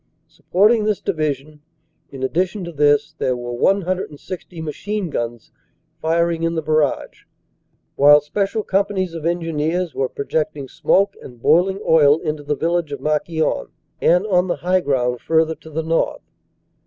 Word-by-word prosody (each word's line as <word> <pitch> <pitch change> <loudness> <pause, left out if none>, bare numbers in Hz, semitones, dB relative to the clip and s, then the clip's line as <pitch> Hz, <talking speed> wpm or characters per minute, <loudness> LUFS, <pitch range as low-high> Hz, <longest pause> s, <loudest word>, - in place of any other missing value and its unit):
Supporting 210 +4 +2
this 215 -2 0
Division, 150 -1 -3 0.5
in 135 -1 -8
addition 185 +8 -1
to 170 - -6
this, 145 0 +2
there 125 -1 0
were 120 0 -5
160 180 +1 -2
machine 180 +4 -4
guns 120 -2 -4 0.5
firing 165 +1 +1
in 165 0 0
the 160 - -2
barrage, 155 -2 -1 0.7
while 145 +1 +7
special 200 +8 -2
companies 190 -3 0
of 165 -1 -3
Engineers 165 0 -1
were 135 -1 -1
projecting 145 -1 -3
smoke 200 +8 +2
and 120 -2 -12
boiling 180 +9 +3
oil 150 -2 +6
into 155 -2 -4
the 145 0 -2
village 170 0 -1
of 140 - -4
Marquion, 155 - -1 0.3
and 180 +4 +3
on 185 -3 +2
the 175 - 0
high 185 +1 +1
ground 125 -5 0
further 160 0 +2
to 160 - -14
the 160 +1 -3
north. 165 +1 -1
160 Hz, 145 wpm, -20 LUFS, 145-180 Hz, 0.7 s, while